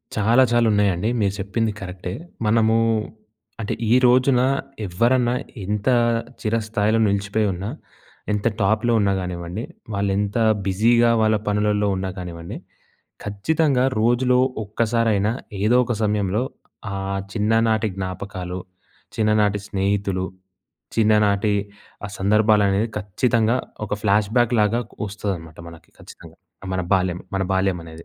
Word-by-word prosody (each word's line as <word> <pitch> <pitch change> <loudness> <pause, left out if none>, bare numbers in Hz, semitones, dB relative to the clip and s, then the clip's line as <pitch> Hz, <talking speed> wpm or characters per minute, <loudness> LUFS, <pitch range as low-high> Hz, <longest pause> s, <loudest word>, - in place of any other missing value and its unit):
చాలా 115 +5 +4
చాలా 120 -1 +3
ఉన్నాయండి. 100 0 +1
మీరు 100 -1 +1
చెప్పింది 110 +3 -1
కరెక్టే. 90 -1 -6 0.3
మనము 110 +1 +3 0.9
అంటే, 105 - -2 0.2
ఈ - - +6
రోజున 125 +1 +4 0.4
ఎవ్వరన్నా 120 +6 +2 0.3
ఇంత 105 +4 -3 0.5
చిర 110 +1 0
స్థాయిలో 110 0 +1
నిలిచిపోయున్నా, 100 -1 -1 0.6
ఎంత 105 +1 0
టాప్‌లో 110 +4 +2
ఉన్నా 100 -1 +2
కానివ్వండి, 90 +3 -5 0.3
వాళ్ళు 100 0 0
ఎంత 100 +2 -1 0.3
బిజీగా 115 +5 +3
వాళ్ళ 110 0 +3
పనులల్లో 105 0 +1
ఉన్నా 95 0 -3
కానివ్వండి, 85 -2 -7 0.7
ఖచ్చితంగా! 130 +6 +1 0.2
రోజులో 125 +2 +3 0.3
ఒక్కసారైనా 110 -1 +1 0.3
ఏదో 110 +4 +4
ఒక 120 0 -2
సమయంలో 105 0 0 0.5
ఆ - - -3 0.4
చిన్ననాటి 110 0 +2
జ్ఞాపకాలు, 95 -1 -5 0.6
చిన్ననాటి 105 -1 +2
స్నేహితులు, 100 -1 -1 0.7
చిన్ననాటి 105 -2 +3 0.5
ఆ - - -8
సందర్భాలనేవి 105 +1 +3
ఖచ్చితంగా! 115 +3 +1 0.3
ఒక - - -8
ఫ్లాష్‌బాక్ 110 +4 +2
లాగ 105 +1 +2 0.2
కొ - - -21
వస్తదనమాట. 95 -6 -5
మనకి 80 - -16
ఖచ్చితంగా! - - -14 0.4
మన 90 - -1
బాల్యం, 90 -2 0 0.2
మన 95 - 0
బాల్యం 95 -2 0
అనేది. 80 0 -11
105 Hz, 115 wpm, -22 LUFS, 95-115 Hz, 0.9 s, ఈ